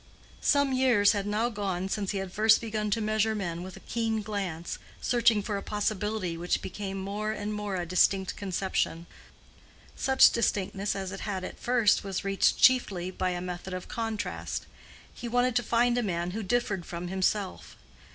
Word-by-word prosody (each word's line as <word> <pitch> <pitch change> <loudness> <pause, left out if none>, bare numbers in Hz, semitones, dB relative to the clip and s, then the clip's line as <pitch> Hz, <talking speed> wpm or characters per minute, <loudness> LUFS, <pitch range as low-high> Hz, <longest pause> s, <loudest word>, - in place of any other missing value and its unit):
Some 285 -2 +3
years 250 -6 +4
had 205 -1 -2
now 215 +3 +1
gone 195 -4 -2
since 200 0 -2
he 200 - -1
had 190 -1 -4
first 220 +3 +5
begun 215 -2 -2
to 220 +2 0
measure 215 +1 +1
men 175 -5 -3
with 185 +1 -8
a - - -13
keen 225 -2 -1
glance, 195 -6 -4 0.2
searching 235 -4 +3
for 205 -1 -2
a - - -4
possibility 210 -3 -2
which 175 +2 -1
became 195 +1 -5
more 205 +3 -3
and 210 0 -3
more 210 -2 -3
a 175 -1 -2
distinct 185 +2 +2
conception. 190 -3 -2 0.9
Such 265 -1 +6
distinctness 200 -3 0
as 190 -1 -4
it 195 - -6
had 195 -3 -3
at - - -7
first 240 -4 +3
was 195 -1 -3
reached 195 0 +2
chiefly 195 -8 +3
by 185 0 -1
a 175 -1 -3
method 180 +1 -5
of 185 - -6
contrast: 225 -2 -3 0.5
he 240 - -7
wanted 245 +1 +1
to - - +3
find 240 +1 +2
a - - +1
man 175 -4 -2
who 220 +4 -3
differed 205 -3 0
from 175 +1 -6
himself. 190 +1 -1
205 Hz, 180 wpm, -28 LUFS, 185-220 Hz, 0.9 s, Such